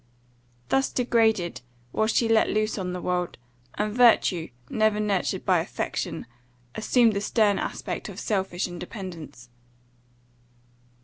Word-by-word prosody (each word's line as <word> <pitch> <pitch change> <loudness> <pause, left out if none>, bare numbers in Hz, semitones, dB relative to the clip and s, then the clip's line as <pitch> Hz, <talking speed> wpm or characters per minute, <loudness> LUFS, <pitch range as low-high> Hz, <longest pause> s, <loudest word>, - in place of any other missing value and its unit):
Thus 270 0 +2
degraded, 225 -7 +1 0.3
was 220 +8 +1
she 235 - +2
let 225 -1 +4
loose 215 0 0
on 180 -1 -3
the 180 0 -4
world; 180 -1 -1 0.4
and 210 0 -1
virtue, 220 -8 +4 0.2
never 215 +3 +1
nurtured 205 -3 -1
by - - +4
affection, - - -3 0.5
assumed 225 +1 +3
the 200 - -1
stern 210 -1 +2
aspect - - -4
of - - -8
selfish 190 -4 -1
independence. 175 - -8
210 Hz, 120 wpm, -26 LUFS, 180-220 Hz, 0.5 s, let